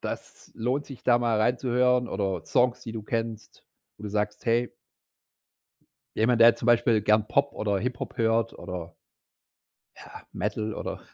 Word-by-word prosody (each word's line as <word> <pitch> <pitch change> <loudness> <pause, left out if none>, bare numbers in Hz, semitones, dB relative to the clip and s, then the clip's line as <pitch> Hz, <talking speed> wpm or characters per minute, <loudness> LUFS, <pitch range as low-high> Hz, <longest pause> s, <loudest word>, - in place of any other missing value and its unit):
das - - -7
lohnt 130 +5 -2
sich, 135 -3 -11
da 120 -1 +4
mal 115 -2 +1
rein 120 +3 +2
zu 130 - -4
hören“, 125 0 +2
oder 95 -4 -2
Songs, 125 -1 +2
die 115 - -7
du 110 -2 -5
kennst, 115 0 -5 0.3
wo - - -15
du 105 - -3
sagst, 105 0 -2
„hey” 120 +1 +1 1.4
Jemand, 115 +1 +2
der 115 0 +8
zum 120 - -5
Beispiel 120 -2 +4
gern 105 +1 +2
Pop 140 +3 +1
oder 100 -2 -1
Hip 125 +4 -3
Hop - - -6
hört 115 -1 +1
oder 85 -3 -7 1.0
ja, - - -13 0.2
Metal 105 +2 -3
oder - - -5
115 Hz, 165 wpm, -26 LUFS, 105-125 Hz, 1.4 s, der